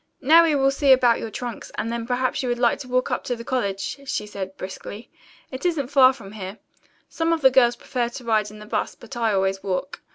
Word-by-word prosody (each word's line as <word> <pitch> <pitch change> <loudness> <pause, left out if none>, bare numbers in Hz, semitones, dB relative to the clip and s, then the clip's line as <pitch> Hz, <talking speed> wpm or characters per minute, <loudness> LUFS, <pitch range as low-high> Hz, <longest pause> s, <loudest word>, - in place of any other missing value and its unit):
"Now 325 +5 +6
we 310 -3 +2
will 270 -1 +3
see 275 0 +3
about 245 -3 +5
your 225 - -5
trunks, 235 +1 -6
and 225 - -2
then 235 -1 -4
perhaps 255 +1 0
you 255 - -2
would 240 - 0
like 240 -1 +2
to 265 - -8
walk 255 0 0
up - - -1
to 245 - -1
the 230 - -9
college," 230 -1 -2
she 210 - -2
said 195 -2 -7
briskly. 195 +3 -8 0.4
"It 260 0 -7
isn't 320 -8 0
far 265 -2 +6
from 230 -7 -11
here. 200 -1 -7 0.5
Some 330 0 -1
of 330 -1 +1
the 265 -1 +6
girls 240 -2 +4
prefer 240 0 -2
to 245 +1 -9
ride 220 -2 +1
in 215 - -12
the 210 - -11
bus, 210 - -2
but 270 - -11
I 230 -2 +1
always 195 -1 0
walk. 195 +9 -3
240 Hz, 240 wpm, -23 LUFS, 210-265 Hz, 0.5 s, Now